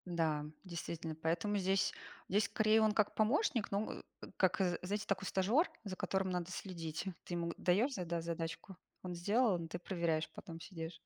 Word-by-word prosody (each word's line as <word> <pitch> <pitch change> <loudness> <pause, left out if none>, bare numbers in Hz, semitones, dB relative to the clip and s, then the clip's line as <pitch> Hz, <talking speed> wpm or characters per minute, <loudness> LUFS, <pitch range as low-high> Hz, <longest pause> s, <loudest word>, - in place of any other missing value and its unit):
Да, 155 -3 +1 0.2
действительно. 170 -2 -4
Поэтому 165 +6 0
здесь 195 +1 +2 0.4
здесь 205 +3 +3
скорее, 220 0 +4
он 215 -1 +5
как 210 -1 +2
помощник, 235 - +2
но, 200 +2 0
э, - - -7 0.2
э, - - -6
как, 190 +2 +4 0.3
знаете, 205 +3 -2
такой 195 -1 0
стажер, 220 - +3
за 195 - -3
которым 190 +1 0
надо 180 -1 -2
следить. 170 -4 -4 0.2
Ты 175 - -4
ему 170 0 -1
даешь 215 +10 +3
зада 170 -4 -1
задачку, 165 +3 -4 0.3
он 180 -1 -3
сделал, 200 0 +2
ты 175 - -4
проверяешь 170 -3 0
потом 165 -1 -8
сидишь. 165 -2 -7
185 Hz, 170 wpm, -36 LUFS, 170-205 Hz, 0.4 s, он